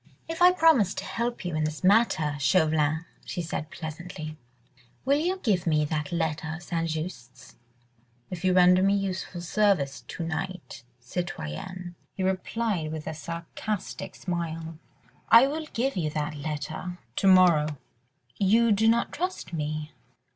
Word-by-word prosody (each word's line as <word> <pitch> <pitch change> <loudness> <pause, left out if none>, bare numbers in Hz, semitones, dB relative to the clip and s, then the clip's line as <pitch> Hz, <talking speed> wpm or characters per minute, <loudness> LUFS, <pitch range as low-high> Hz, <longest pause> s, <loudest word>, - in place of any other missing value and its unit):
"If 330 +1 -5
I 360 +1 +9
promise 320 - +4
to - - -4
help 235 +2 -3
you 175 - -2
in 155 - 0
this 155 +2 -3
matter, 185 -7 +3
Chauvelin," 155 0 +2 0.2
she 175 - -4
said 155 -1 -4
pleasantly, 155 -1 -7 0.7
"will 280 +2 +3
you 360 +4 0
give 200 - 0
me 155 -2 +3
that 150 -1 -3
letter 160 -1 -1
of 175 - -10
St. 165 -1 -2
Just's?" 155 -6 -6 0.8
"If 180 -1 -6
you 185 - +3
render 180 0 +6
me 195 +1 +4
useful 185 -2 -3
assistance 175 -6 +1
to 170 - -5
night, 165 +2 -5 0.2
citoyenne," 175 - -5 0.2
he 190 - -2
replied 190 -2 -1
with 155 -1 -5
a 160 - -3
sarcastic 170 +5 -5
smile, 165 -2 -4 0.5
"I 230 +3 +9
will 305 +3 -3
give 265 +4 0
you 165 -5 0
that 150 0 -2
letter... 155 +4 -5 0.2
to 195 - +2
morrow." 170 -6 +5 0.6
"You 225 +4 +4
do 215 +2 +3
not 235 +1 +3
trust 355 - -4
me?" 155 -1 -3
175 Hz, 145 wpm, -27 LUFS, 155-200 Hz, 0.8 s, I